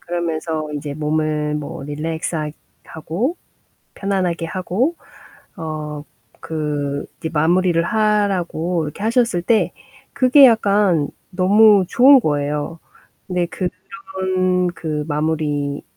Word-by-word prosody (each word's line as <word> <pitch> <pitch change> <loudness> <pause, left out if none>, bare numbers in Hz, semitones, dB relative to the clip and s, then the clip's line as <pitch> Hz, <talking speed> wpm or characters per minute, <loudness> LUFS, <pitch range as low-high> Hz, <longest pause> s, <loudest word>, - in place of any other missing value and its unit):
그러면서 160 -2 -3
인제 145 -1 -5
몸을 150 0 -1
뭐 150 -2 -5
릴렉스학 155 +1 -3 0.3
하고 180 - -3 0.6
편안하게 185 -4 -1
하고 190 - -1 0.6
어 155 -3 -5 0.4
그 145 -3 -3
이제 160 - -4
마무리를 170 +2 +2
하라고 185 -5 0
이렇게 150 +6 -7
하셨을 230 -4 +2
때 220 +5 +1 0.4
그게 270 +2 +6
약간 200 - +3 0.2
너무 200 +1 +5
좋은 265 +6 +7
거예요. 150 -1 -2 0.5
근데 180 -1 -1
그런 185 0 -2
그 155 -3 -3
마무리 150 -2 -1
170 Hz, 220 characters per minute, -20 LUFS, 150-195 Hz, 0.6 s, 좋은